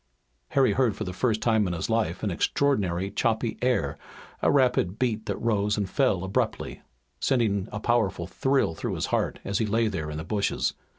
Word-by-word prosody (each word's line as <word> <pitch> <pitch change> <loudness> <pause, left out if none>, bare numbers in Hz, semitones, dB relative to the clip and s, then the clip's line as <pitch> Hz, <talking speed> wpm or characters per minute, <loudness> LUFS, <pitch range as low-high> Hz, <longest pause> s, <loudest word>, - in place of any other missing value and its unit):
Harry 135 - +3
heard 120 -6 +2
for - - -4
the 90 - -5
first 110 +3 0
time 110 -4 +3
in 90 - -2
his 85 - -3
life 110 -6 0
an 105 - 0
extraordinary, 95 -3 +1
choppy 115 0 0
air, 85 - 0 0.4
a - - +3
rapid 125 -8 +2
beat 110 -3 -1
that - - -1
rose 105 -2 +1
and 100 -2 -2
fell 105 -10 +2
abruptly, 95 +1 -2 0.4
sending 110 -6 +1
a 110 - -4
powerful 105 -7 +1
thrill 135 0 +1
through - - -3
his - - -1
heart - - +1
as 100 0 -1
he 110 - +1
lay 115 +2 +2
there 80 -7 -3
in 75 - -5
the 80 - -4
bushes. 100 +4 0
105 Hz, 190 wpm, -26 LUFS, 95-120 Hz, 0.4 s, Harry